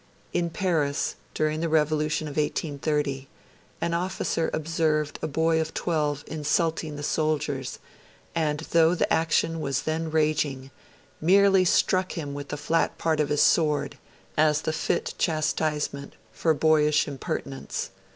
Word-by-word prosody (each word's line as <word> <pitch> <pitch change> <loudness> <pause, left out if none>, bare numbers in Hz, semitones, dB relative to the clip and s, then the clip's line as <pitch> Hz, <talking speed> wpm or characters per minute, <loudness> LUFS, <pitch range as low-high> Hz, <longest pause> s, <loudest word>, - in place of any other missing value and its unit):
In 175 -1 0
Paris, 160 -6 0 0.2
during 155 0 0
the 165 0 -1
Revolution 155 0 +1
of - - -5
1830, 150 -2 -1 0.5
an 170 - 0
officer 175 -2 -1
observed 155 -1 0
a - - -1
boy 160 +2 +2
of 160 0 -5
twelve 150 -4 -1
insulting 160 0 -1
the 145 - -6
soldiers, 145 -4 -1 0.6
and 155 -2 0
'though 165 +1 +3
the - - +1
action 165 0 +1
was 140 -3 -1
then 160 +1 -2
raging, 150 -4 0 0.5
merely 190 +2 +5
struck 185 +1 +2
him 145 -4 -5
with 145 0 -6
the 145 - -3
flat 165 +3 0
part 160 -2 0
of 150 - +1
his 150 - +3
sword, 150 -4 +2 0.4
as 155 0 +3
the 160 - -1
fit - - -1
chastisement 155 -3 -1 0.2
for 160 -2 +1
boyish 150 -1 +3
impertinence. 135 -4 -4
155 Hz, 135 wpm, -26 LUFS, 150-165 Hz, 0.6 s, merely